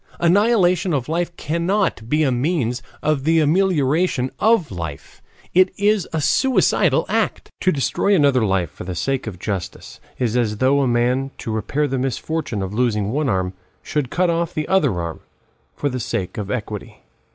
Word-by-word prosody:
Annihilation 185 -1 +3
of 130 -3 -2
life 170 +2 -1
cannot 170 - -1
be 155 +2 +2
a 135 - +2
means 125 -2 0 0.2
of 150 -3 +1
the 165 +2 +3
amelioration 155 -4 +2
of 220 - +3
life; 85 -6 -7 0.3
it 185 +1 +5
is 205 -2 +2
a 160 - -1
suicidal 260 - +2
act. - - -1
To 185 - +2
destroy 185 +7 +1
another 140 -7 +3
life 95 -6 0
for - - -9
the 90 0 -5
sake 135 +6 -2
of 100 -5 -5
justice 95 -1 -5 0.2
is 120 -2 -1
as 110 -4 0
though 135 +4 +3
a 135 - +2
man, 125 +3 +1
to 115 - -5
repair 125 +7 -1
the 135 -1 -2
misfortune 130 -3 -2
of 95 +1 -5
losing 105 -3 0
one 145 +1 0
arm, 95 -1 0 0.3
should 145 -5 -2
cut 180 +3 +1
off 170 0 -1
the 155 - -2
other 145 - +2
arm 85 -1 -4 0.6
for 145 - -2
the 130 -2 -2
sake 110 -5 -3
of 100 -2 -5
equity. 105 -4 -5
135 Hz, 175 wpm, -21 LUFS, 110-170 Hz, 0.6 s, it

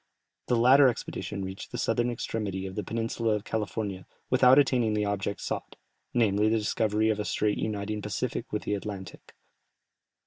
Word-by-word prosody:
The 125 - +2
latter 130 +4 +7
expedition 105 -4 -3
reached 95 +1 -7
the - - -4
southern 120 +1 +1
extremity 105 -5 -3
of 95 - -6
the 105 - -3
peninsula 115 +1 -1
of 105 - -4
California 105 -4 -3 0.2
without 130 +1 +6
attaining 125 -6 +3
the 105 0 +1
object 100 0 -2
sought, - - -4 0.4
namely 110 -3 +3
the 115 - +2
discovery 110 0 +1
of 105 - -2
a - - 0
strait 105 0 0
uniting 105 0 -2
the - - -6
Pacific - - -3
with - - -2
the - - -1
Atlantic. 100 -2 -7
105 Hz, 170 wpm, -28 LUFS, 100-115 Hz, 0.4 s, latter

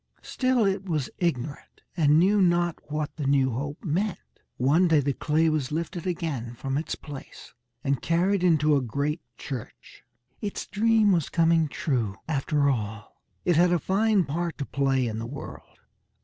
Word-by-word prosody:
Still 255 -3 +1
it 195 -1 -1
was 150 -5 -1
ignorant, 145 -5 -3
and 150 -2 +4
knew 195 +4 +4
not 175 -3 +1
what 150 -1 -3
the 145 -3 -2
new 135 -2 +3
hope 140 +5 -5
meant. 180 +4 0 0.4
One 150 +8 +3
day 160 -3 +4
the 140 0 0
clay 155 +5 +1
was 155 -4 0
lifted 165 +2 -3
again 145 -10 -3
from 135 +3 -3
its 155 +3 -2
place, 145 -3 -11 0.3
and 140 -1 0
carried 180 +3 +1
into 155 -4 +4
a 140 - +2
great 140 +7 -2 0.2
church. 130 -6 -8 0.4
Its 205 -2 -4
dream 215 0 +3
was 170 -6 +1
coming 165 -1 +3
true 120 -9 -1
after 145 -1 +1
all. 110 -5 -3 0.2
It 175 -3 +3
had 175 +1 +5
a 175 - +4
fine 200 +4 +2
part 170 +3 -3
to 140 - -3
play 135 -2 +1
in 110 -1 -3
the 115 - -5
world. 140 +3 -9
155 Hz, 165 wpm, -26 LUFS, 140-175 Hz, 0.4 s, had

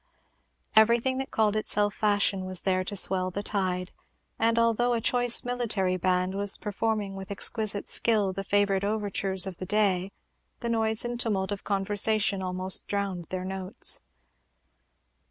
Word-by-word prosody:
Everything 235 +4 +3
that 270 - -5
called 215 -1 0
itself 210 -1 0
Fashion 205 -2 +1
was 185 -1 -3
there 185 -1 0
to 205 - -6
swell 185 -1 +2
the 200 +3 -5
tide; 185 -3 -2 0.5
and 230 +1 +1
although 230 +1 +2
a - - -1
choice 245 +1 +2
military 225 -7 -1
band 185 +1 0
was 200 0 +2
performing 210 -1 -3
with 195 0 -9
exquisite 205 0 0
skill 210 -4 +2
the 195 +1 -5
favorite 200 -1 0
overtures 200 -2 -1
of 190 -3 -7
the 185 - -6
day, 195 -3 0 0.5
the 235 - -3
noise 220 0 +2
and 240 0 -4
tumult 200 -4 -1
of 200 - -5
conversation 205 0 0
almost 185 0 0
drowned 200 -4 -3
their 185 +2 -6
notes. 190 0 +4
200 Hz, 150 wpm, -26 LUFS, 190-220 Hz, 0.5 s, notes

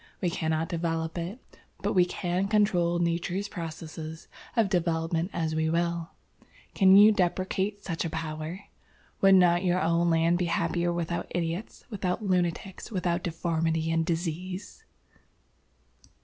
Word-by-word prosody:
We 180 -3 0
cannot 160 -1 -1
develop 165 -1 -2
it. 180 +8 -7 0.2
But - - 0
we 180 -2 +5
can 180 +1 -1
control 195 -5 +2
Nature's 175 +3 -1
processes 160 -2 -7 0.3
of 225 -3 +4
development 165 -1 0
as 160 -2 -2
we 160 0 +1
will. 170 0 -1 0.6
Can 190 -1 +6
you 210 +2 +9
deprecate 190 +1 -1
such 165 -3 -3
a 165 - -2
power? 160 +2 -5 0.6
Would 195 0 +7
not 175 -1 +4
your 180 0 +2
own 170 0 +2
land 165 +1 +3
be 180 - +1
happier 170 +1 0
without 170 0 -2
idiots, 170 +4 -4
without 195 0 -2
lunatics, 180 +1 -1
without 180 -3 0
deformity 165 -1 -1
and 165 0 +2
disease?" 175 +3 -4
170 Hz, 135 wpm, -28 LUFS, 165-185 Hz, 0.6 s, you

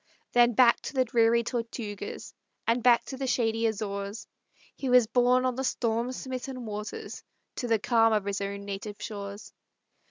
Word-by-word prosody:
Then 240 0 +5
back 235 +1 +5
by - - -5
the 260 -1 +3
dreary 235 0 +3
Tortugas, 225 -3 -5 0.3
And 230 +2 +2
back 240 0 +5
by 265 - -6
the 265 0 -3
shady 230 -2 +1
Azores, 200 0 -4 0.5
He 270 - -3
was 250 -2 +6
borne 250 +2 +3
on 255 - +1
the 265 +2 -3
storm 235 -1 0
smitten 255 -1 -6
waters 210 0 -6 0.3
To 245 - -2
the 225 -1 +3
calm 225 +1 +3
of 210 -2 +1
his 200 0 -2
own 200 0 -4
native 200 +1 -6
shores. 200 -1 -7
230 Hz, 165 wpm, -28 LUFS, 210-245 Hz, 0.5 s, was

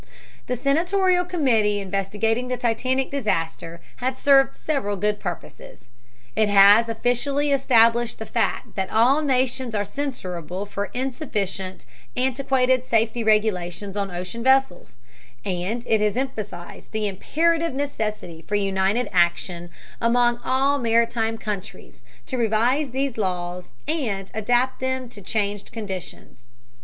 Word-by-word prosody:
The 250 - -1
senatorial 355 - +2
committee 235 - +2
investigating 205 +5 -1
the 250 0 -2
Titanic 255 +3 0
disaster 170 -9 -2 0.2
has 260 +1 -2
served 270 -1 +4
several 235 -10 -2
good 210 +2 0
purposes. 175 -3 -8 0.5
It 215 -1 +3
has 205 +3 +7
officially 260 +6 0
established 235 -3 +3
the 220 - -6
fact - - -1
that 190 -1 -2
all 250 +7 +4
nations 255 -4 0
are 205 0 0
censurable 190 - -5
for 200 0 -3
insufficient, 205 - -3 0.3
antiquated 260 -1 +2
safety 230 -1 +1
regulations 205 -3 0
on 200 -1 -1
ocean 180 +6 -6
vessels, 265 - +2 0.5
and 195 +6 -2
it 220 -1 +2
has 210 +2 +1
emphasized 210 -9 -5
the 215 -1 -1
imperative 325 - 0
necessity 215 - -4
for 210 - -1
united 195 +3 +1
action 175 -1 +1 0.3
among 240 0 +3
all 275 +2 +2
maritime 230 -1 +1
countries 210 -3 -7 0.2
to 260 - -3
revise 240 +6 +2
these 265 -2 -2
laws 180 -2 -2 0.2
and 220 - -2
adapt 245 +4 +1
them 260 -1 -2
to 210 - -12
changed 205 0 -2
conditions. 190 - -8
225 Hz, 125 wpm, -23 LUFS, 200-260 Hz, 0.5 s, has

